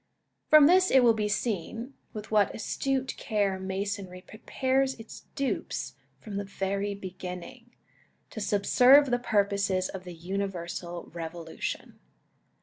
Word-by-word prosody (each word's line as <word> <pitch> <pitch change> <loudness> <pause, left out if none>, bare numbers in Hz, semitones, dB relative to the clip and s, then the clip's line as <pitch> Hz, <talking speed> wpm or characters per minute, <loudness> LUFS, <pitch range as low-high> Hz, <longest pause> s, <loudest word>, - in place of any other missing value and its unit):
From 305 -2 +9
this 370 +4 +5
it 265 -1 +5
will 235 -1 +6
be 215 -1 -1
seen, 225 +4 -2 0.2
with 215 -1 -8
what 210 -2 +3
astute 265 +4 -1
care 200 -3 0
Masonry 190 -1 -4
prepares 260 +6 -1
its 225 - -11
dupes 275 -1 -2 0.3
from 210 -4 -7
the 200 - -2
very 200 +1 -2
beginning, 185 +5 -8 0.6
to 220 - -6
subserve 250 +7 +5
the 245 - +2
purposes 200 -4 +1
of 190 -1 -7
the 180 -1 -9
universal 175 -1 -5
Revolution. 165 -1 -6
200 Hz, 125 wpm, -28 LUFS, 185-245 Hz, 0.6 s, From